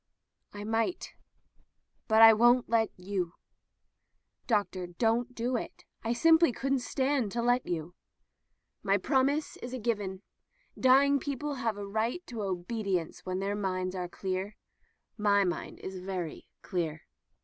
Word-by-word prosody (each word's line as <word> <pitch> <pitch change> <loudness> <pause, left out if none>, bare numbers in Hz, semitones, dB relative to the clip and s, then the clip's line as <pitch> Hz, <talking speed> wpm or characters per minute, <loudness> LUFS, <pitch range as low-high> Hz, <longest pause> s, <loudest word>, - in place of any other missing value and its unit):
"I 205 0 -7
might. 225 - -1 0.9
But 220 0 +6
I 225 0 +11
won't 240 +3 +4
let 225 -1 +2
you." 180 -2 -3 1.1
"Doctor, 200 -5 0
don't 230 +7 0
do 245 +2 -1
it. 235 - -5 0.2
I 225 - -1
simply 325 +5 +5
couldn't 270 +3 0
stand 265 0 0
it 200 - -6
to 235 0 -1
let 245 +1 +2
you." 170 0 -3 0.9
"My 195 0 +2
promise 275 +7 +1
is 250 +1 -6
given. 205 -4 -2 0.5
Dying 275 +2 +5
people 285 +2 -3
have 225 -3 -1
a 205 - -5
right 225 - -2
to 235 -3 -6
obedience 190 -2 -3
when 185 0 -1
their 200 +2 -1
minds 185 -2 -2
are 180 -2 -4
clear. 190 +3 -4 0.6
Mine 200 -3 +1
is 190 0 -7
very 180 -3 -5 0.2
clear." 160 -3 -3
220 Hz, 135 wpm, -30 LUFS, 190-245 Hz, 1.1 s, I